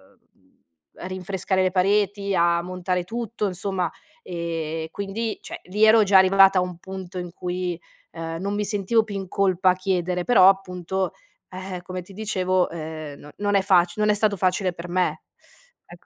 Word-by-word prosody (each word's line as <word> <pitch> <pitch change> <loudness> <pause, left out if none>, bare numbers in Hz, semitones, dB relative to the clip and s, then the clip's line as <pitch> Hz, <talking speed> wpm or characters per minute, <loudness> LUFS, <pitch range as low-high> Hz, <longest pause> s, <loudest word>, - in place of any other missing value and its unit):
uhm, - - -39 0.7
a 180 - -7
rinfrescare 185 0 -1
le 185 - +1
pareti, 200 +1 +1
a 170 0 +3
montare 180 0 -2
tutto 230 0 -3
insomma. 185 -2 -2 0.3
Ehm, 165 - -4
quindi, 205 +3 -4
cioè, - - -8
lì 205 +4 -1
ero 220 0 +7
già 195 -1 +5
arrivata 195 0 +6
a - - +2
un 180 -1 -4
punto 190 0 -8
in 175 -1 -5
cui, 180 -1 -3 0.3
ehm, 165 0 -5
non 200 +3 -2
mi 210 0 -1
sentivo 205 +2 +1
più 210 -2 -7
in 195 -1 -4
colpa 185 -1 +2
a - - +1
chiedere, 180 -1 -1
però 195 -3 +7
appunto, 190 -1 -1 0.4
eh-eh, 185 -1 -6
come 185 0 -6
ti 195 +2 -15
dicevo, 185 -3 0
ehm, 155 -3 -7
no 145 - -12
non 205 0 0
è 195 - +5
facile 180 +1 +3
non 210 - +4
è - - -1
stato 210 -1 +2
facile 185 0 +1
per 170 0 -8
me. 180 +1 0 0.6
Ecc - - -15
185 Hz, 180 wpm, -24 LUFS, 175-200 Hz, 0.7 s, ero